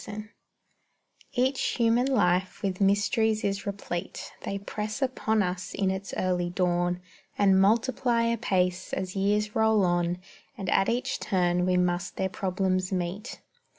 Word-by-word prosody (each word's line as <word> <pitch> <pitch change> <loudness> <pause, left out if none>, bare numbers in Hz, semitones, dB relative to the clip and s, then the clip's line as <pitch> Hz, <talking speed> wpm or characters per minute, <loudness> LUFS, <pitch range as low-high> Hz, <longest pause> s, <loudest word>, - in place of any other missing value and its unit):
_" - - -11
SONNET 210 0 -7 1.0
Each 260 +2 +1 0.2
human 235 +1 +3
life 185 -6 +1
with 190 -1 -2
mysteries 215 +2 +2
is 200 0 -2
replete; 195 -3 -5
They 200 - -3
press 210 +3 -4
upon 220 -5 +1
us 180 0 -4
in 195 -1 +1
its 190 0 -5
early 180 -1 0
dawn, 175 -1 0 0.4
And 195 -2 +5
multiply 230 +3 +2
apace 190 -6 0
as 185 0 -3
years 210 +2 +1
roll 220 -3 +4
on, 175 0 +1 0.4
And 195 -3 -3
at 195 - +3
each 240 +2 -1
turn 180 -2 +1
we 180 0 +3
must 175 0 0
their 190 - -1
problems 185 0 -1
meet. 185 +5 -4
195 Hz, 145 wpm, -27 LUFS, 180-215 Hz, 1.0 s, And